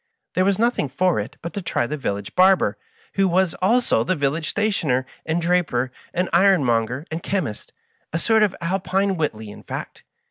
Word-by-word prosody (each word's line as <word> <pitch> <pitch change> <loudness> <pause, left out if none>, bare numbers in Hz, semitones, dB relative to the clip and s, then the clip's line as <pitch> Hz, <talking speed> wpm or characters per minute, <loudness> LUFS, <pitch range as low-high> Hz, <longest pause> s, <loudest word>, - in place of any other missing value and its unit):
There 185 - +2
was 195 -1 +2
nothing 230 - +1
for 175 +2 +1
it 100 - -6
but 170 - -5
to 200 - -3
try 170 -8 -1
the 150 - -3
village 100 -8 -4
barber, 190 +1 +4 0.4
who 195 -1 +2
was 185 -1 +2
also 225 - +3
the 185 - 0
village 150 +2 -1
stationer, 155 -12 0 0.2
and 160 +1 +1
draper, 165 -8 +1 0.2
and 180 +1 0
iron 190 -2 +5
monger, 120 +4 0
and 160 +1 -3
chemist 165 - -3 0.2
— - - -43
a 165 - -1
sort 220 +5 +3
of 210 -3 +2
Alpine 190 +2 0
Whiteley, 110 - -3
in - - -11
fact. - - -7
170 Hz, 185 wpm, -22 LUFS, 135-190 Hz, 0.4 s, iron